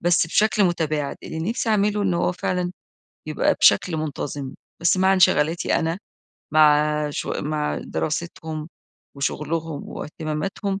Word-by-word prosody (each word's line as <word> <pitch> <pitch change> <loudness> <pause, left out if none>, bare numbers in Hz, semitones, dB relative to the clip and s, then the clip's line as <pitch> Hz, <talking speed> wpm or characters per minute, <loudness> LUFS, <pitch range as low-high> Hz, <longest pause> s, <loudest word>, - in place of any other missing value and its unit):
بس 175 -1 +3
بشكل 210 +3 +3
متباعد، 155 -5 -1
اللي 160 - -6
نفسي 230 0 -2
أعمله 210 -1 +2
إن 185 -3 +1
هو 175 +1 +1
فعلًا 180 0 -2 0.6
يبقى - - +2
بشكل 165 -4 +4
منتظم. 145 -3 -4 0.3
بس 170 +2 +3
مع 190 +1 +4
انشغالاتي 170 -3 +3
أنا، 165 +2 -1 0.6
مع 150 -1 +4
ش - - -4
مع 150 0 -2
دراستهم 160 -1 -4 0.5
وشغلهم 155 +2 -3
واهتماماتهم 165 +6 -4
160 Hz, 120 wpm, -23 LUFS, 150-180 Hz, 0.6 s, بشكل